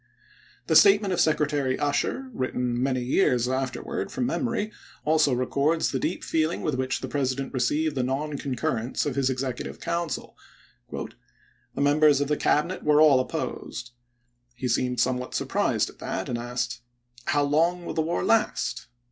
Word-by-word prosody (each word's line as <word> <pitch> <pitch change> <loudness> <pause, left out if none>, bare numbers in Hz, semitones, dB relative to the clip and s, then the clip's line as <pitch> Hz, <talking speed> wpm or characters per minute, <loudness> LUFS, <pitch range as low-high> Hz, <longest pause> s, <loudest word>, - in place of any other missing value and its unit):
The - - +1
statement 200 -1 +6
of - - +2
Secretary 150 -4 +1
Usher, 250 - -1
written 125 - -1
many 130 -1 0
years 125 -3 +2
afterward 130 0 -3
from 250 - -1
memory, 230 -4 -1 0.3
also 155 -2 +3
records 140 +6 +1
the - - -1
deep 170 - -2
feeling 160 +1 0
with 155 - 0
which 130 0 -1
the - - -4
President 135 -1 -2
received 150 +4 +1
the 135 - -1
non 140 +4 -2
concnrrence 125 -3 -2
of 145 - -1
his 135 -1 +1
Executive 130 -1 -3
Council: 170 -2 -3 0.6
"The - - -4 0.8
members 145 0 +5
of 145 0 -1
the 150 - +2
Cabinet 160 +5 +1
were 150 0 +4
all 150 -4 +7
opposed. 130 -3 -4 0.6
He 125 +1 -3
seemed 125 +1 0
somewhat 125 +1 0
surprised - - 0
at - - -24
that - - -3
and 120 - -2
asked, 120 0 -3 0.5
i - - +2
How 145 0 +3
long 165 +5 +1
will - - -4
the 160 - +1
war 165 +2 -1
last 225 -1 +1
145 Hz, 160 wpm, -26 LUFS, 130-160 Hz, 0.8 s, all